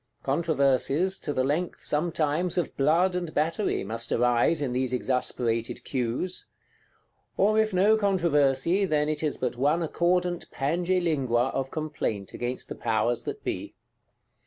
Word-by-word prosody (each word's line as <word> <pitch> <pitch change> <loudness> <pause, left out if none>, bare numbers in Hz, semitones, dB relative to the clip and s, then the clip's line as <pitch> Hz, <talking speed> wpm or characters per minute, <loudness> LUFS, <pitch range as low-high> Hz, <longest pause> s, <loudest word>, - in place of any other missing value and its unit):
Controversies, 150 +4 +1
to 145 - -3
the 130 -2 0
length, 155 +6 -2
sometimes 160 +2 0
of 175 - -1
blood 165 +7 +3
and 175 -3 -3
battery, 165 +7 0
must 115 +3 -4
arise 120 +6 +3
in 135 -4 -2
these 130 0 -1
exasperated 120 -2 -1
Queues. 130 +8 -3 0.9
Or 215 +3 +3
if 220 0 +2
no 200 +4 +4
controversy, 170 -4 +2
then 150 -4 +1
it 155 -1 -2
is 155 -2 -1
but 125 -1 -2
one 150 +6 +2
accordant 175 +2 0
Pange 175 +6 0
Lingua 130 -6 +1
of 135 0 -2
complaint 150 -11 -3
against 120 +1 -4
the - - -5
Powers 115 +1 0
that - - -5
be. - - -4
150 Hz, 140 wpm, -27 LUFS, 130-175 Hz, 0.9 s, no